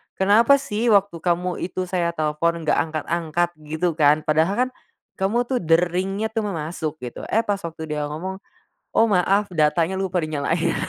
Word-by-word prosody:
"Kenapa 220 +8 +5
sih 240 -4 -2
waktu 200 -5 +3
kamu 175 +1 -1
itu 185 0 -3
saya 175 -2 -1
telfon 160 +2 0
gak 155 - +2
angkat-angkat?" 165 +2 -1 0.2
gitu 160 +3 0
kan, 150 +1 +4
"Padahal 160 +5 +2
kan, - - -10 0.5
kamu 210 +6 +1
tuh 250 +1 -1
deringnya 180 +5 +1
tuh 225 - -1
ma 200 - -3
masuk," 155 0 -4
gitu. 120 - -6
Eh, 225 - +1
pas 205 -2 -1
waktu 165 -3 -7
dia 150 -1 -2
ngomong, 185 +6 -5 0.6
"Oh, 225 -1 +4
maaf, 195 +2 +2
datanya 165 +3 +1
lupa 185 -2 -1
dinyalain." 155 +2 -1
175 Hz, 165 wpm, -22 LUFS, 160-195 Hz, 0.6 s, Kenapa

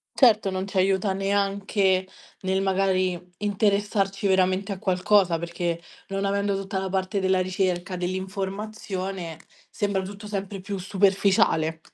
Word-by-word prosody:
Certo, 220 -6 +5
non 190 0 -2
c'aiuta 195 0 +1
neanche 195 -1 +1 0.3
nel 190 0 0
magari 190 -2 +1 0.2
interessarci 200 -1 +1
veramente 190 +1 +2
a 195 - -3
qualcosa, 185 -2 +3
perché 170 0 -3 0.3
non 195 0 -2
avendo 200 0 +1
tutta 195 0 -3
la 190 0 -1
parte 190 +1 -1
della 190 -1 +2
ricerca 185 -1 -1
dell'informazione, 190 -1 -4 0.3
sembra 200 -2 -1
tutto 205 +2 -8
sempre 200 -1 -4
più 200 +1 -4
superficiale. 190 -4 +2
195 Hz, 120 wpm, -25 LUFS, 185-200 Hz, 0.3 s, Certo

